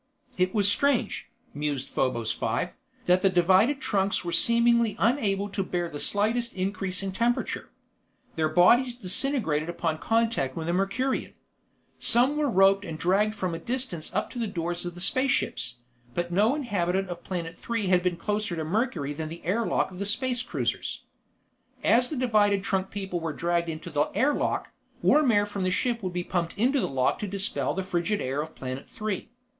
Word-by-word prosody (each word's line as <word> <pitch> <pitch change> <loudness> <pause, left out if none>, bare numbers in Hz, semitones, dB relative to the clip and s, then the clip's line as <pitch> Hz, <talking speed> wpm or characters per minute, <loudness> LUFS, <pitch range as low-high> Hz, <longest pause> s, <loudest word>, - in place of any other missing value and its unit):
It 185 0 +1
was 205 -2 +3
strange, 245 +1 +1 0.2
mused 145 -3 -3
Probos 120 -4 0
Five, 120 +10 -1 0.4
that 180 +1 +4
the 195 - +4
divided 190 +9 +3
trunks 195 -5 0
were 170 - -2
seemingly 235 +4 +3
unable 205 -5 +1
to 200 0 -2
bear 175 -2 -2
the 145 - -6
slightest 225 +6 +1
increase 190 0 -2
in 195 - -2
temperature. 235 +5 -1 0.6
Their 155 -1 0
bodies 240 +10 +4
disintegrated 185 - 0
upon 165 -2 -2
contact 225 - 0
with 160 -1 -4
a 170 - 0
Mercurian. 200 +8 -1 0.6
Some 245 +5 +4
were 300 -1 +1
roped 195 -1 +4
and 165 -5 -6
dragged 200 +6 +1
from 185 -4 -2
a 165 - -4
distance 240 -11 -2
up - - -2
to 245 - -6
the 230 - -1
doors 175 -2 -2
of 175 - -7
the 175 - -4
space 260 +8 +4
ships, - - 0 0.4
but 175 0 -2
no 210 +9 +3
inhabitant 195 - -1
of 175 -1 -7
Planet 170 -3 -4
Three 230 -3 -3
had 180 -1 +3
been 180 -1 -1
closer 210 0 -2
to 160 - -3
Mercury 170 - -1
than 155 +1 -5
the 165 +1 -10
air 215 +6 0
lock - - 0
of 180 - -10
the 200 - -2
space 250 +3 0
cruisers. 250 - -3 0.8
As 245 +2 +4
the 310 - -3
divided 210 -5 +2
trunk 190 -1 -1
people 190 -3 -4
were 165 -2 -3
dragged 170 +1 0
into 165 +2 -6
the 145 0 +1
air 290 +3 +3
lock, - - -2 0.3
warm 300 -5 +5
air 205 -1 +3
from 205 -1 -5
the 185 - +1
ship 235 +5 0
would 185 -2 -3
be 180 0 -2
pumped 175 0 -2
into 260 +6 +2
the - - -1
lock 130 -1 +1
to 210 - -3
dispel 200 +1 -1
the 190 - -2
frigid 185 +3 -1
air 135 +3 -2
of 160 +1 -8
Planet 130 +1 -6
Three. 215 -2 -4
195 Hz, 190 wpm, -27 LUFS, 170-230 Hz, 0.8 s, warm